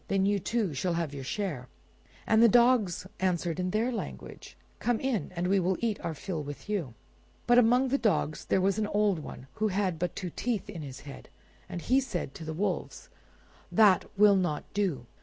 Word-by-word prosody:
Then 195 Hz, -1 st, +1 dB
you, 200 Hz, 0 st, +2 dB
too, 205 Hz, -2 st, -1 dB
shall 170 Hz, +6 st, -1 dB
have 165 Hz, -4 st, -2 dB
your 140 Hz, -1 st, -6 dB
share." 145 Hz, -4 st, -3 dB, 0.6 s
And 220 Hz, +1 st, +4 dB
the 235 Hz, -, +7 dB
dogs 235 Hz, -6 st, +3 dB
answered 175 Hz, -2 st, 0 dB
in 180 Hz, 0 st, 0 dB
their 225 Hz, +6 st, 0 dB
language, 230 Hz, -, -7 dB, 0.2 s
"Come 240 Hz, -2 st, 0 dB
in; 260 Hz, -6 st, -1 dB
and 175 Hz, +1 st, -1 dB
we 195 Hz, +1 st, +3 dB
will 185 Hz, +1 st, +1 dB
eat 225 Hz, -3 st, -1 dB
our 160 Hz, -, -3 dB
fill 165 Hz, 0 st, -4 dB
with 145 Hz, +4 st, -8 dB
you." 175 Hz, -, -3 dB, 0.5 s
But 240 Hz, 0 st, +6 dB
among 245 Hz, +3 st, +4 dB
the 275 Hz, +2 st, +1 dB
dogs 175 Hz, -8 st, 0 dB
there 190 Hz, -, +2 dB
was 195 Hz, +2 st, +1 dB
an 210 Hz, -, 0 dB
old 205 Hz, -4 st, +1 dB
one, 140 Hz, -3 st, -9 dB, 0.2 s
who 215 Hz, -, +4 dB
had 190 Hz, -4 st, -1 dB
but 175 Hz, -1 st, -2 dB
two 180 Hz, -3 st, -4 dB
teeth 235 Hz, +1 st, -2 dB
in 170 Hz, -5 st, -7 dB
his 135 Hz, -2 st, -8 dB
head, 140 Hz, -1 st, -11 dB, 0.4 s
and 175 Hz, -, -5 dB
he 260 Hz, +2 st, +3 dB
said 180 Hz, -, -4 dB
to -, -, -9 dB
the 160 Hz, -, -5 dB
wolves— 185 Hz, +4 st, -3 dB, 0.6 s
"That 210 Hz, -4 st, +5 dB
will 205 Hz, 0 st, +7 dB
not 175 Hz, -6 st, 0 dB
do. 180 Hz, -12 st, -1 dB
190 Hz, 200 wpm, -29 LUFS, 165-215 Hz, 0.6 s, the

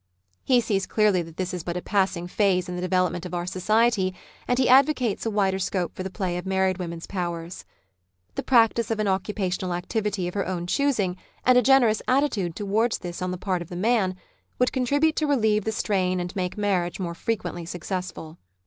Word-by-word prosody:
He 250 Hz, -2 st, +4 dB
sees 200 Hz, -4 st, -1 dB
clearly 210 Hz, -4 st, +3 dB
that 165 Hz, -1 st, -10 dB
this 185 Hz, -1 st, -2 dB
is 180 Hz, -3 st, -4 dB
but 175 Hz, +1 st, -3 dB
a -, -, -3 dB
passing 190 Hz, -4 st, 0 dB
phase 185 Hz, 0 st, +1 dB
in 180 Hz, -, -5 dB
the 180 Hz, -, -4 dB
development 185 Hz, -1 st, 0 dB
of 180 Hz, -1 st, -5 dB
our 175 Hz, 0 st, -2 dB
society, 195 Hz, +1 st, +1 dB, 0.3 s
and 245 Hz, -, +1 dB
he 260 Hz, -, +3 dB
advocates 255 Hz, -4 st, +3 dB
a -, -, +2 dB
wider 195 Hz, -3 st, +1 dB
scope 185 Hz, -2 st, -2 dB
for -, -, -5 dB
the 190 Hz, -, -3 dB
play 185 Hz, -2 st, -3 dB
of 180 Hz, -, -8 dB
married 190 Hz, -1 st, +1 dB
vs^omen's 170 Hz, -2 st, -5 dB
powers. 175 Hz, -2 st, -5 dB, 0.7 s
The -, -, -3 dB
practice 235 Hz, -2 st, +3 dB
of 225 Hz, -1 st, -1 dB
an 215 Hz, -, +1 dB
occupational 190 Hz, -2 st, -1 dB
activity 200 Hz, 0 st, -2 dB
of 175 Hz, -, -5 dB
her 200 Hz, -, -2 dB
own 180 Hz, -2 st, -3 dB
choosing, 205 Hz, -5 st, 0 dB, 0.3 s
and 255 Hz, -, +6 dB
a 250 Hz, -, +6 dB
generous 245 Hz, -3 st, +4 dB
attitude 240 Hz, -, +1 dB
towards 215 Hz, +3 st, 0 dB
this 175 Hz, -1 st, -7 dB
on 185 Hz, -, -1 dB
the 180 Hz, -, -3 dB
part 185 Hz, -1 st, -2 dB
of 170 Hz, -, -8 dB
the 175 Hz, -, -7 dB
man, 195 Hz, -1 st, +1 dB, 0.4 s
would 250 Hz, -, +2 dB
contribute 285 Hz, +5 st, +2 dB
to 305 Hz, -, +1 dB
relieve 220 Hz, -7 st, +2 dB
the 220 Hz, -, 0 dB
strain 185 Hz, -4 st, 0 dB
and 175 Hz, +3 st, -5 dB
make 180 Hz, 0 st, -2 dB
marriage 190 Hz, -4 st, 0 dB
more 175 Hz, -2 st, -3 dB
frequently 175 Hz, -3 st, -3 dB
successful. 175 Hz, -2 st, -5 dB
190 Hz, 200 wpm, -25 LUFS, 180-220 Hz, 0.7 s, and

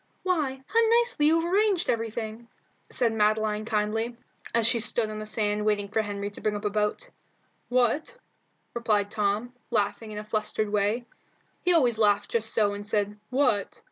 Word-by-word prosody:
"Why, 290 Hz, -8 st, -1 dB
how 455 Hz, -, +1 dB, 0.2 s
nicely 470 Hz, -11 st, +2 dB
you 325 Hz, +2 st, +4 dB
have 340 Hz, +2 st, -2 dB
arranged 405 Hz, -3 st, +2 dB
everything!" 225 Hz, 0 st, -3 dB, 0.4 s
said 235 Hz, -2 st, 0 dB
Madeline 215 Hz, 0 st, +1 dB
kindly, 225 Hz, +2 st, -1 dB, 0.3 s
as 230 Hz, -1 st, +2 dB
she 235 Hz, +1 st, +3 dB
stood 225 Hz, -1 st, 0 dB
on 215 Hz, -, -5 dB
the 215 Hz, -, -6 dB
sand 210 Hz, -1 st, 0 dB
waiting 205 Hz, -1 st, 0 dB
for 220 Hz, +2 st, +1 dB
Henry 205 Hz, -1 st, -4 dB
to -, -, -8 dB
bring 215 Hz, -1 st, 0 dB
up 205 Hz, +1 st, -5 dB
a 205 Hz, -, +1 dB
boat. 210 Hz, -, -1 dB, 0.6 s
"What?" 255 Hz, -, +1 dB, 0.6 s
replied 210 Hz, -4 st, 0 dB
Tom, 215 Hz, +3 st, -1 dB, 0.2 s
laughing 220 Hz, 0 st, -1 dB
in 210 Hz, -, -7 dB
a 210 Hz, -, -4 dB
flustered 215 Hz, 0 st, -1 dB
way. 210 Hz, +4 st, +1 dB, 0.6 s
He 360 Hz, -, +3 dB
always 250 Hz, -10 st, +3 dB
laughed 205 Hz, -1 st, +3 dB
just 225 Hz, -1 st, 0 dB
so 205 Hz, -2 st, +2 dB
and 205 Hz, 0 st, -6 dB
said 210 Hz, 0 st, -1 dB
"what?" 250 Hz, -7 st, +1 dB
220 Hz, 175 wpm, -27 LUFS, 210-245 Hz, 0.6 s, you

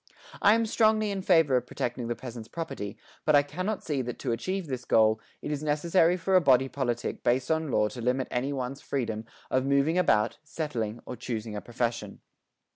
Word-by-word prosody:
I 205 Hz, +2 st, +6 dB
am 230 Hz, 0 st, +1 dB
strongly 215 Hz, -1 st, +2 dB
in 195 Hz, -1 st, -2 dB
favour 165 Hz, -8 st, +4 dB
of 125 Hz, 0 st, -3 dB
protecting 120 Hz, 0 st, -3 dB
the 120 Hz, -, -2 dB
peasant's 115 Hz, -1 st, -8 dB
property, 140 Hz, -12 st, -5 dB, 0.3 s
but 155 Hz, -, +4 dB
I 145 Hz, -, +6 dB
cannot 185 Hz, +9 st, -3 dB
see 145 Hz, -4 st, -1 dB
that 125 Hz, -1 st, -5 dB
to -, -, -2 dB
achieve 185 Hz, +10 st, -2 dB
this 130 Hz, -4 st, -4 dB
goal, 110 Hz, -1 st, +3 dB, 0.2 s
it -, -, -3 dB
is 150 Hz, -1 st, -2 dB
necessary 165 Hz, +4 st, +2 dB
for 185 Hz, +2 st, +1 dB
a 185 Hz, -, +7 dB
body 135 Hz, -3 st, +4 dB
politic 120 Hz, -3 st, -3 dB
based 125 Hz, +5 st, +1 dB
on 160 Hz, -1 st, 0 dB
law 105 Hz, -4 st, +2 dB
to 120 Hz, -, -8 dB
limit 125 Hz, +2 st, 0 dB
any 130 Hz, +3 st, -1 dB
one's 135 Hz, 0 st, -4 dB
freedom 115 Hz, -5 st, -3 dB, 0.3 s
of 130 Hz, -, +2 dB
moving 140 Hz, +5 st, +3 dB
about, 105 Hz, -11 st, +2 dB
settling 120 Hz, -9 st, -4 dB
or 125 Hz, -, -6 dB
choosing 110 Hz, -3 st, -4 dB
a 105 Hz, -, -4 dB
profession. 115 Hz, -4 st, -3 dB
135 Hz, 200 wpm, -28 LUFS, 120-165 Hz, 0.3 s, a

